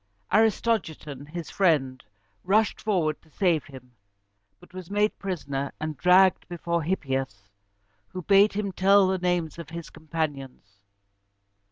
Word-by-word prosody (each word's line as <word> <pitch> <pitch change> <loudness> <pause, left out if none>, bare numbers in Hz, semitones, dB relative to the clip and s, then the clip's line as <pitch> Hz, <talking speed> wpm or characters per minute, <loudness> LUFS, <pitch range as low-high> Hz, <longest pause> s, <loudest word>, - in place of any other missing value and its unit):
Aristogiton, 190 - 0
his 170 0 -7
friend, 140 -9 +1 0.4
rushed 210 +3 +1
forward 170 -8 0
to 160 - -25
save 165 -2 +1
him, 130 -3 -13 0.7
but - - -19
was 185 -2 -9
made 210 +1 0
prisoner, 140 -8 -4
and 155 0 -4
dragged 180 +6 +4
before 170 -1 -2
Hippias, 135 - -3 0.6
who 185 - -7
bade 200 +3 +5
him 200 -1 -2
tell 195 +2 +4
the 190 0 0
names 175 -2 -1
of 165 - -8
his 170 0 -8
companions. 140 -10 -5
170 Hz, 130 wpm, -26 LUFS, 145-190 Hz, 0.7 s, bade